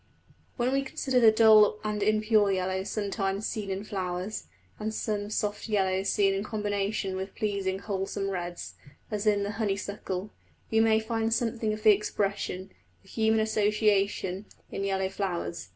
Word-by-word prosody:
When 250 0 +1
we 275 - +2
consider 265 -1 0
the 225 -2 +7
dull 215 -1 +6
and 210 -1 -2
impure 215 0 +3
yellows 190 +1 -1
sometimes 200 -1 -2
seen 210 -4 -3
in 190 +1 -3
flowers, 185 0 -4 0.3
and 215 +1 -2
some 210 -2 -2
soft 210 +1 -2
yellows 190 -2 +1
seen 195 -1 +3
in 195 +1 -1
combination 205 -2 -2
with 190 +1 -5
pleasing 200 -3 -1
wholesome 195 0 -3
reds, 175 -2 -5 0.4
as 210 0 -2
in 205 -1 +3
the 200 - -2
honeysuckle, 200 -2 -3 0.4
we 220 - +3
may 220 -1 +4
find 225 0 0
something 230 -2 -1
of 215 0 -5
the 215 - +8
expression 195 -2 -1 0.3
the 195 - -20
human 220 +1 +2
association 210 -2 +1 0.2
in 195 - -3
yellow 190 -1 0
flowers. 185 - -4
205 Hz, 150 wpm, -28 LUFS, 195-215 Hz, 0.4 s, the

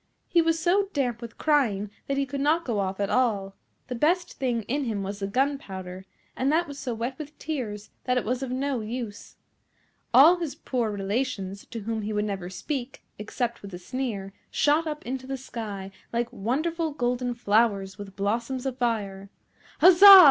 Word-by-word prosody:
He 340 - +4
was 330 0 +2
so 385 +4 +2
damp 245 -5 -1
with 235 -1 -8
crying 220 -10 +2 0.2
that 275 - -1
he 275 - +1
could 275 +1 -4
not 315 +4 +2
go 230 -5 -1
off 190 0 -2
at 200 -1 0
all. 205 -6 +1 0.3
The 250 - -5
best 345 +8 +1
thing 245 -4 0
in 275 +6 -1
him 210 -4 -2
was 200 +1 -5
the 195 - -2
gunpowder, 195 -7 -2 0.3
and 265 +2 +1
that 335 +2 +2
was 285 -1 -8
so 250 -4 -3
wet 240 +5 -4
with 300 0 -8
tears 230 -9 -4
that 250 0 +2
it 250 - 0
was 250 +3 -1
of 265 - -3
no 260 -1 -1
use. 220 -1 -6 0.8
All 295 +9 +8
his 335 -5 -4
poor 240 -4 -1
relations, 200 -1 -2
to 230 - -6
whom 220 +1 -2
he 215 +1 -3
would 210 0 0
never 195 -4 -4
speak, 260 +6 -5 0.2
except 235 +3 -3
with 200 -2 -8
a - - -5
sneer, 200 -1 -4 0.2
shot 305 +3 +2
up 300 -1 -5
into 260 +1 -4
the 270 0 -3
sky 210 -7 -6 0.2
like 235 0 -1
wonderful 315 - -1
golden 245 -2 -1
flowers 205 -4 +1
with 195 -1 -8
blossoms 235 +6 -1
of 260 -1 -3
fire. 200 -5 -1 0.5
Huzza! 380 +2 +11
245 Hz, 185 wpm, -26 LUFS, 205-275 Hz, 0.8 s, Huzza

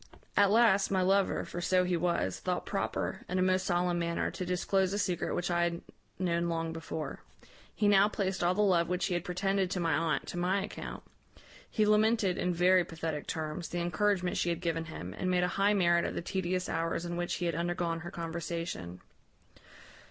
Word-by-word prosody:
"At 200 -1 +5
last, 215 -2 +4
my 190 -1 +2
lover 195 +1 +2
(for 175 - -6
so 185 +1 +3
he 180 0 0
was) 170 - 0
thought - - -2
proper, - - -2
in 185 - -1
a 185 - +3
most 185 0 +2
solemn 175 -1 +1
manner, 170 0 -1
to - - -5
disclose 185 +1 0
a - - 0
secret 180 -4 -1
which 175 0 -1
I 175 0 +2
had 170 0 -2 0.4
known 170 -1 0
long 165 -1 -2
before. 160 -2 -5 0.6
He 210 - +2
now 200 0 +5
placed 190 -3 -2
all 175 +1 +2
the 210 - +3
love 175 -4 +3
which 180 0 0
he - - -1
had 175 -1 -1
pretended 190 +1 0
to 185 - -2
my 165 -2 +1
aunt 160 +1 0
to - - -5
my 185 +3 +1
account. - - -7 0.7
He 215 - +2
lamented, 215 -2 +3
in 180 - +1
very 180 +1 +4
pathetic 160 -3 -5
terms, 160 +2 -4
the 175 - -4
encouragement 180 +2 0
she 175 - +1
had 170 -1 -1
given 165 -2 -2
him, 95 - -7
and 185 - -2
made 180 -1 +2
a - - +3
high 205 +1 +4
merit 170 -3 +3
of - - -3
the - - -3
tedious 185 0 -1
hours 165 +1 -1
in 175 0 -3
which 175 0 -2
he 175 - -3
had 170 - 0
undergone 170 0 -1
her 175 +2 -7
conversation. 165 - -5
175 Hz, 205 wpm, -31 LUFS, 170-190 Hz, 0.7 s, At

